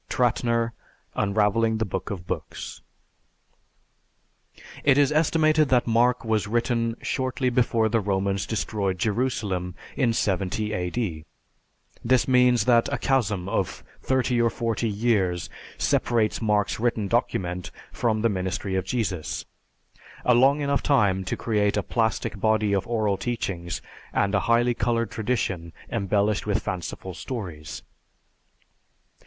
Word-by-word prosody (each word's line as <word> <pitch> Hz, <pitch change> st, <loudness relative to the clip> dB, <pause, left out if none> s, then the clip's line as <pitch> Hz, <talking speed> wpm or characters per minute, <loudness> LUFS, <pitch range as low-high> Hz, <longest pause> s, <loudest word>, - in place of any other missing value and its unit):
(Trattner, 115 Hz, -1 st, +1 dB, 0.4 s
"Unravelling 105 Hz, +2 st, +2 dB
the 110 Hz, -, 0 dB
Book 95 Hz, -1 st, -4 dB
of 90 Hz, -4 st, -5 dB
Books.") -, -, -6 dB, 2.0 s
It 140 Hz, -2 st, +5 dB
is 145 Hz, 0 st, +4 dB
estimated 155 Hz, -1 st, +3 dB
that 125 Hz, -2 st, +3 dB
Mark 120 Hz, +1 st, +2 dB
was 110 Hz, -2 st, +1 dB
written 115 Hz, 0 st, 0 dB
shortly 130 Hz, 0 st, -1 dB
before 115 Hz, -2 st, +2 dB
the 115 Hz, +1 st, +2 dB
Romans 100 Hz, -1 st, -1 dB
destroyed 100 Hz, -3 st, -1 dB
Jerusalem 100 Hz, -4 st, -1 dB, 0.2 s
in 125 Hz, -4 st, +2 dB
70 105 Hz, 0 st, -1 dB
A.D. 90 Hz, -3 st, -2 dB, 0.8 s
"This 125 Hz, +1 st, +3 dB
means 125 Hz, -3 st, +4 dB
that 120 Hz, -2 st, +4 dB
a -, -, 0 dB
chasm 110 Hz, -9 st, 0 dB
of 95 Hz, -2 st, -2 dB, 0.2 s
30 130 Hz, -2 st, +1 dB
or 115 Hz, -, +3 dB
40 115 Hz, 0 st, -1 dB
years 100 Hz, -5 st, 0 dB, 0.3 s
separates 110 Hz, -2 st, +1 dB
Mark's 105 Hz, -2 st, +1 dB
written 115 Hz, -3 st, 0 dB
document 90 Hz, -6 st, -1 dB, 0.2 s
from 110 Hz, -3 st, 0 dB
the -, -, +5 dB
ministry 95 Hz, 0 st, -2 dB
of 95 Hz, -1 st, 0 dB
Jesus 95 Hz, -7 st, -2 dB, 0.8 s
a 125 Hz, -, +5 dB
long 135 Hz, +5 st, +4 dB
enough 140 Hz, 0 st, +1 dB
time 100 Hz, -9 st, +2 dB
to -, -, -2 dB
create 105 Hz, -3 st, +1 dB
a -, -, 0 dB
plastic 110 Hz, -3 st, -1 dB
body 110 Hz, -1 st, +2 dB
of 100 Hz, -1 st, 0 dB
oral 110 Hz, -4 st, +1 dB
teachings 95 Hz, -7 st, -3 dB, 0.3 s
and 100 Hz, 0 st, +1 dB
a 100 Hz, -, +4 dB
highly 120 Hz, +1 st, +4 dB
colored 115 Hz, 0 st, 0 dB
tradition 95 Hz, -8 st, -2 dB, 0.2 s
embellished 105 Hz, 0 st, 0 dB
with 105 Hz, -, 0 dB
fanciful 95 Hz, +1 st, -5 dB
stories." 85 Hz, -, -6 dB
110 Hz, 125 wpm, -25 LUFS, 100-120 Hz, 2.0 s, It